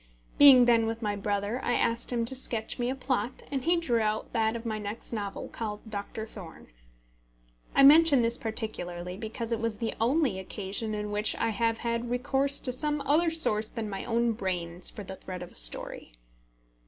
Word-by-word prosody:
Being 270 Hz, -4 st, +9 dB
then 230 Hz, -2 st, +3 dB
with 225 Hz, +1 st, -4 dB
my 205 Hz, -1 st, -1 dB
brother, 205 Hz, +3 st, -2 dB
I 245 Hz, -, 0 dB
asked 230 Hz, +1 st, 0 dB
him 235 Hz, -1 st, 0 dB
to 265 Hz, -, -2 dB
sketch 235 Hz, -2 st, -3 dB
me 240 Hz, 0 st, 0 dB
a 260 Hz, -, -2 dB
plot, 260 Hz, -1 st, -3 dB
and 270 Hz, -2 st, -2 dB
he 345 Hz, +1 st, +3 dB
drew 250 Hz, -9 st, 0 dB
out 215 Hz, 0 st, -2 dB
that 220 Hz, -1 st, +1 dB
of 230 Hz, 0 st, -7 dB
my 215 Hz, -2 st, -3 dB
next 210 Hz, +3 st, -6 dB
novel, 205 Hz, -3 st, -5 dB
called 215 Hz, -1 st, -6 dB
Doctor 210 Hz, +1 st, -5 dB
Thorne. 190 Hz, -7 st, -12 dB, 1.1 s
I 275 Hz, -, +5 dB
mention 290 Hz, -2 st, +7 dB
this 230 Hz, +1 st, 0 dB
particularly, 180 Hz, -6 st, -4 dB
because 225 Hz, +2 st, -6 dB
it 230 Hz, -, 0 dB
was 230 Hz, -2 st, -2 dB
the 225 Hz, +1 st, -3 dB
only 250 Hz, -4 st, +1 dB
occasion 200 Hz, +3 st, -5 dB
in 210 Hz, 0 st, -4 dB
which 210 Hz, +1 st, +2 dB
I -, -, -1 dB
have 225 Hz, +1 st, 0 dB
had 235 Hz, +1 st, -3 dB
recourse 270 Hz, +3 st, +3 dB
to 255 Hz, -, +1 dB
some 295 Hz, +3 st, 0 dB
other 320 Hz, +5 st, +2 dB
source 220 Hz, -10 st, +3 dB
than 220 Hz, -3 st, -5 dB
my 195 Hz, -, -5 dB
own 235 Hz, 0 st, +1 dB
brains 180 Hz, -4 st, -2 dB
for 205 Hz, -, -9 dB
the 190 Hz, 0 st, -8 dB
thread 180 Hz, -1 st, -7 dB
of 175 Hz, -, -11 dB
a -, -, -21 dB
story. -, -, +1 dB
225 Hz, 195 wpm, -28 LUFS, 210-245 Hz, 1.1 s, Being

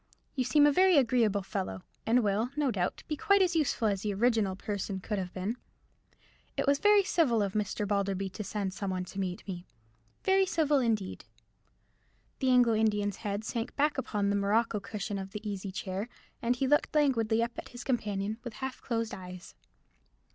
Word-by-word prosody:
You 260 Hz, -, +1 dB
seem 290 Hz, +4 st, +5 dB
a 295 Hz, -, +6 dB
very 370 Hz, +2 st, +5 dB
agreeable 230 Hz, -6 st, +3 dB
fellow, 185 Hz, -, -4 dB, 0.2 s
and 240 Hz, +2 st, +4 dB
will, 210 Hz, +4 st, +1 dB
no 290 Hz, -4 st, +1 dB
doubt, 185 Hz, -4 st, -2 dB
be 305 Hz, -, -1 dB
quite 400 Hz, +3 st, +4 dB
as 355 Hz, -2 st, 0 dB
useful 290 Hz, -7 st, +1 dB
as 200 Hz, -2 st, 0 dB
the 205 Hz, -1 st, -2 dB
original 220 Hz, -3 st, +2 dB
person 200 Hz, -1 st, -4 dB
could 210 Hz, +2 st, -3 dB
have 180 Hz, -1 st, -4 dB
been. 195 Hz, +7 st, -3 dB, 1.0 s
It -, -, +1 dB
was 280 Hz, 0 st, +3 dB
very 415 Hz, -1 st, +5 dB
civil 270 Hz, -, +2 dB
of 195 Hz, -1 st, -2 dB
Mr. 210 Hz, 0 st, -1 dB
Balderby 195 Hz, -1 st, 0 dB
to 210 Hz, -, -5 dB
send 195 Hz, -1 st, -3 dB
some 200 Hz, 0 st, -4 dB
one 185 Hz, -1 st, -2 dB
to 195 Hz, -, -7 dB
meet 185 Hz, 0 st, -3 dB
me—very 175 Hz, -, -2 dB
civil 300 Hz, -5 st, +2 dB
indeed." 220 Hz, -6 st, -1 dB, 1.1 s
The 265 Hz, -, +1 dB
Anglo 245 Hz, -2 st, +5 dB
Indian's 210 Hz, -2 st, +1 dB
head 205 Hz, 0 st, -3 dB
sank 230 Hz, +2 st, -4 dB
back 295 Hz, -1 st, +1 dB
upon 205 Hz, -5 st, 0 dB
the -, -, +1 dB
morocco 210 Hz, +2 st, +1 dB
cushion 200 Hz, 0 st, -4 dB
of 195 Hz, 0 st, -7 dB
the 210 Hz, 0 st, -6 dB
easy 195 Hz, -1 st, -4 dB
chair, 190 Hz, +3 st, -4 dB, 0.3 s
and 240 Hz, +1 st, +1 dB
he 265 Hz, -, 0 dB
looked 295 Hz, +3 st, +2 dB
languidly 230 Hz, -6 st, +3 dB
at 235 Hz, 0 st, -5 dB
his 245 Hz, 0 st, -9 dB
companion, 215 Hz, -3 st, -1 dB
with 240 Hz, -3 st, -6 dB
half 265 Hz, +1 st, -5 dB
closed 230 Hz, -3 st, -2 dB
eyes. 185 Hz, -2 st, -9 dB
215 Hz, 185 wpm, -30 LUFS, 195-255 Hz, 1.1 s, a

